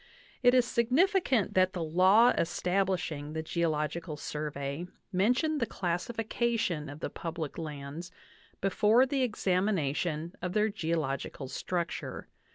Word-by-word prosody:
It 245 Hz, 0 st, +5 dB
is 250 Hz, -1 st, +5 dB
significant 260 Hz, -, +2 dB
that 185 Hz, 0 st, +3 dB
the 175 Hz, -3 st, -2 dB
law 185 Hz, +9 st, +5 dB
establishing 175 Hz, -4 st, -1 dB
the 160 Hz, 0 st, -3 dB
Geological 160 Hz, -1 st, -1 dB
Survey 150 Hz, +1 st, -4 dB, 0.3 s
mentioned 250 Hz, -, +2 dB
the. 230 Hz, -, 0 dB
classification 210 Hz, -, -1 dB
of 145 Hz, +2 st, -9 dB
the -, -, -2 dB
public 165 Hz, -3 st, -5 dB
lands 150 Hz, +2 st, -6 dB, 0.5 s
before 210 Hz, +6 st, +4 dB
the 270 Hz, 0 st, -1 dB
ex 240 Hz, -4 st, -2 dB
amination 170 Hz, -4 st, 0 dB
of 180 Hz, 0 st, -3 dB
their 215 Hz, +1 st, +3 dB
geological 160 Hz, -8 st, -2 dB
structure. 170 Hz, +5 st, -4 dB
180 Hz, 120 wpm, -30 LUFS, 155-220 Hz, 0.5 s, It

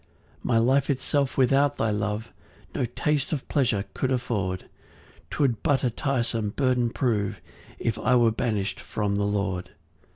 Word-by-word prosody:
6 -, -, -20 dB
My 120 Hz, -, +3 dB
life 130 Hz, +4 st, +3 dB
itself 140 Hz, 0 st, 0 dB
without 135 Hz, +1 st, +3 dB
thy 110 Hz, -, +1 dB
love 105 Hz, +2 st, -2 dB, 0.4 s
No -, -, 0 dB
taste 140 Hz, +4 st, -1 dB
of 140 Hz, -, -3 dB
pleasure 115 Hz, -9 st, +1 dB
could 130 Hz, -, -1 dB
afford; 100 Hz, -7 st, -1 dB, 0.6 s
'Twould 130 Hz, -6 st, +1 dB
but 145 Hz, -4 st, +2 dB
a 125 Hz, -, +2 dB
tiresome 115 Hz, -4 st, -1 dB
burden 125 Hz, 0 st, +1 dB
prove, 110 Hz, -6 st, 0 dB, 0.4 s
If 115 Hz, -2 st, -1 dB
I 125 Hz, -, +3 dB
were 120 Hz, -2 st, +5 dB
banish'd 105 Hz, -3 st, -1 dB
from 105 Hz, -2 st, -2 dB
the 100 Hz, 0 st, +1 dB
Lord. 100 Hz, -3 st, -1 dB
120 Hz, 155 wpm, -26 LUFS, 105-130 Hz, 0.6 s, were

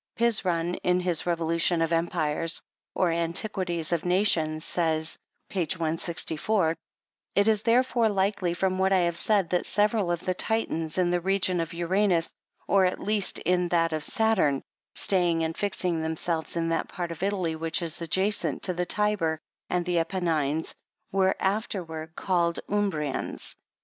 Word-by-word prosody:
Pizron, 180 Hz, -7 st, +2 dB
in 180 Hz, 0 st, +3 dB
his 175 Hz, -2 st, 0 dB
Revolution 170 Hz, 0 st, +1 dB
of 165 Hz, 0 st, +1 dB
Empires, 165 Hz, -1 st, 0 dB, 0.4 s
or 180 Hz, -3 st, +2 dB
Antiquities 170 Hz, 0 st, -1 dB
of 170 Hz, -2 st, 0 dB
Nations, 170 Hz, -4 st, +1 dB
says, 160 Hz, -2 st, -1 dB, 0.3 s
(page 185 Hz, -1 st, -1 dB
164,) 165 Hz, +2 st, 0 dB, 0.3 s
" -, -, -50 dB
It 200 Hz, +1 st, +4 dB
is 215 Hz, -2 st, +3 dB
therefore 235 Hz, 0 st, +3 dB
like 200 Hz, 0 st, 0 dB
ly 175 Hz, -1 st, 0 dB
from 185 Hz, 0 st, 0 dB
what 190 Hz, 0 st, +2 dB
I 190 Hz, -1 st, +4 dB
have 170 Hz, -1 st, 0 dB
said, 195 Hz, -1 st, +1 dB
that 180 Hz, -, 0 dB
several 210 Hz, -2 st, +2 dB
of 175 Hz, -1 st, -1 dB
the 185 Hz, -, -1 dB
Titans, 180 Hz, -6 st, -1 dB
in 180 Hz, -1 st, +2 dB
the 175 Hz, 0 st, +1 dB
reign 185 Hz, -1 st, +1 dB
of 165 Hz, -1 st, -2 dB
Ura 180 Hz, +5 st, +1 dB
nus, 170 Hz, -3 st, +1 dB, 0.4 s
or, 195 Hz, -1 st, +4 dB
at 180 Hz, -, 0 dB
least, 210 Hz, -1 st, 0 dB
in 180 Hz, 0 st, +1 dB
that 165 Hz, -1 st, +1 dB
of 155 Hz, -1 st, -2 dB
Saturn, 190 Hz, -12 st, +2 dB, 0.3 s
staying 175 Hz, -4 st, +2 dB
and 160 Hz, 0 st, -2 dB
fixing 180 Hz, -5 st, -1 dB
themselves 160 Hz, +1 st, -2 dB
in 165 Hz, 0 st, 0 dB
that 165 Hz, -, -1 dB
part 175 Hz, -2 st, -4 dB
of 165 Hz, -, -7 dB
Ttaly 185 Hz, -4 st, -1 dB
which 160 Hz, +1 st, -1 dB
is 165 Hz, 0 st, -4 dB
adjacent 190 Hz, +5 st, 0 dB
to 185 Hz, -, +1 dB
the 180 Hz, 0 st, -2 dB
Tiber 210 Hz, -7 st, +1 dB, 0.3 s
and 175 Hz, -1 st, 0 dB
the 175 Hz, -1 st, +1 dB
Appenines, 160 Hz, -4 st, -1 dB, 0.4 s
were 190 Hz, 0 st, +2 dB
after 200 Hz, -1 st, -1 dB
ward 160 Hz, 0 st, -8 dB
called 170 Hz, -3 st, +1 dB
Um.brians. 185 Hz, -9 st, -2 dB
175 Hz, 165 wpm, -27 LUFS, 165-195 Hz, 0.4 s, It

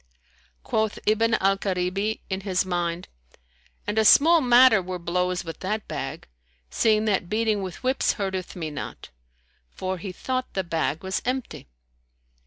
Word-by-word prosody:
Quoth 220 Hz, -1 st, -1 dB
Ibn 225 Hz, +2 st, +3 dB
al 195 Hz, 0 st, +2 dB
Karibi 195 Hz, +3 st, -1 dB
in 190 Hz, 0 st, -3 dB
his 190 Hz, -1 st, 0 dB
mind, 175 Hz, -1 st, -2 dB, 0.8 s
"And 210 Hz, +1 st, 0 dB
a -, -, +4 dB
small 320 Hz, +9 st, +6 dB
matter 245 Hz, -4 st, +6 dB
were 185 Hz, 0 st, -5 dB
blows 180 Hz, +1 st, -1 dB
with 165 Hz, -, -7 dB
that 210 Hz, +3 st, -3 dB
bag, -, -, -5 dB, 0.4 s
seeing 215 Hz, -1 st, +2 dB
that 190 Hz, -4 st, 0 dB
beating 215 Hz, -1 st, +1 dB
with 185 Hz, +5 st, -7 dB
whips 260 Hz, +1 st, +1 dB
hurteth 190 Hz, -3 st, -4 dB
me 160 Hz, -4 st, -4 dB
not;" 145 Hz, -, -7 dB, 0.6 s
for 185 Hz, -, -4 dB
he 190 Hz, +2 st, -6 dB
thought 255 Hz, +7 st, -3 dB
the 190 Hz, -, 0 dB
bag 165 Hz, -2 st, -2 dB
was 190 Hz, 0 st, -2 dB
empty. 255 Hz, -, -4 dB
195 Hz, 150 wpm, -25 LUFS, 180-220 Hz, 0.8 s, small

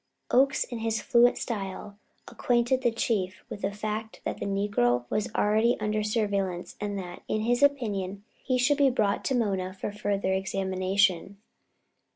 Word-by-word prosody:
Oakes, 270 Hz, +2 st, +4 dB
in 240 Hz, -3 st, -6 dB
his 225 Hz, -1 st, -1 dB
fluent 245 Hz, 0 st, +4 dB
style, 200 Hz, -2 st, -5 dB, 0.3 s
acquainted 245 Hz, +1 st, +1 dB
the 245 Hz, -, +3 dB
Chief 205 Hz, -5 st, -1 dB
with 205 Hz, -, -6 dB
the 195 Hz, -, -1 dB
fact 215 Hz, +2 st, -4 dB
that -, -, -3 dB
the -, -, -3 dB
negro 195 Hz, -13 st, +1 dB
was 215 Hz, +3 st, 0 dB
already 220 Hz, +3 st, +3 dB
under 215 Hz, 0 st, 0 dB
surveillance 200 Hz, -4 st, -1 dB
and 205 Hz, -1 st, -2 dB
that, 180 Hz, -2 st, -7 dB
in 215 Hz, -, -1 dB
his 240 Hz, +3 st, +1 dB
opinion, 205 Hz, -9 st, +1 dB, 0.2 s
he 255 Hz, -2 st, +1 dB
should 280 Hz, +4 st, +2 dB
be 280 Hz, -1 st, +6 dB
brought 210 Hz, -5 st, 0 dB
to 265 Hz, -, +1 dB
Mona 190 Hz, -5 st, -1 dB
for 195 Hz, -, -4 dB
further 200 Hz, -2 st, -1 dB
examination. 190 Hz, 0 st, 0 dB
210 Hz, 160 wpm, -27 LUFS, 195-235 Hz, 0.3 s, be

